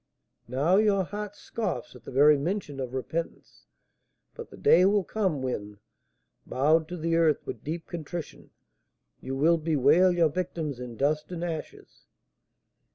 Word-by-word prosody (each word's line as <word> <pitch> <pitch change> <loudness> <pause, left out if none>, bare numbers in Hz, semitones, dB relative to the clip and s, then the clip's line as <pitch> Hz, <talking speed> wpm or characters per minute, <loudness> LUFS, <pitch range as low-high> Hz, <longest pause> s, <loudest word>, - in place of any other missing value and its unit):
Now 145 +10 +2
your 205 -2 +3
heart 205 +2 -6
scoffs 205 - -4
at 125 - -15
the - - -8
very 145 +3 +6
mention 150 -1 -3
of 130 -1 -4
repentance, 160 +6 -5 0.7
but - - -9
the - - -13
day 175 - +5
will 200 +1 +3
come 185 -10 -1
when, 105 -5 -4 0.7
bowed 155 +4 +2
to 180 - -6
the 165 0 0
earth 160 -3 +2
with 115 - -7
deep 165 +3 -4
contrition, 170 0 -7 0.7
you 135 - -5
will 165 +5 +3
bewail 160 +4 +4
your 170 -2 +3
victims 160 -5 -3
in 120 -2 -8
dust 150 +5 0
and 175 -1 -4
ashes. 165 -3 -7
160 Hz, 150 wpm, -27 LUFS, 140-180 Hz, 0.7 s, very